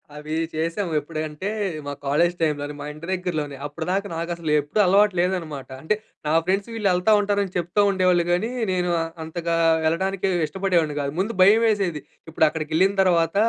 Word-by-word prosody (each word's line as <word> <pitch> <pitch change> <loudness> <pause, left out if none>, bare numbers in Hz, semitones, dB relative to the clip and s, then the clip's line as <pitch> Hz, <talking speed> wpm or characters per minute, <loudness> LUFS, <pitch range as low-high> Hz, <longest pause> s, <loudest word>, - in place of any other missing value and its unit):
అవి 150 +1 -6 0.2
చేసాము. 165 +4 -2
ఎప్పుడంటే 155 +4 -5 0.4
మా 145 - -4
కాలేజ్ 170 +5 +2
టైమ్‌లోనే 150 -2 -1
మా - - -5
ఇంటి 155 +3 -10
దగ్గరలోనే 155 -6 -3
అప్పడిదాకా 180 +7 -2
నాకు 170 +1 -3
అసలు 165 -3 -3
ఎప్పుడు 145 +9 -3
అలవాటు 200 +2 +4
లేదన్నమాట. 170 -6 -2
అంటే, 160 +8 +1 0.3
నా - - +1
ఫ్రెండ్స్ 195 +4 0
వీళ్ళెళ్తా 195 -2 +2
ఉంటారని 200 -2 0
చెప్తా 175 +4 +1
ఉండేవాళ్ళు 185 -2 +3
గానీ 180 +6 +1 0.2
నేను 180 -1 0 0.3
అంతగా 170 +1 -2 0.3
వెళ్ళడానికి 190 +4 0 0.2
ఇష్టపడేవాడిని 175 -4 0
గాదు. 140 -1 -2
ముందు 210 +5 -1
భయం 205 +4 +7
వేసేది. 195 -8 +1 0.3
ఇప్పుడు 160 0 +3
అక్కడికెళ్ళిన 160 +5 +1
తర్వాత, 170 -3 +2
175 Hz, 150 wpm, -23 LUFS, 155-190 Hz, 0.4 s, భయం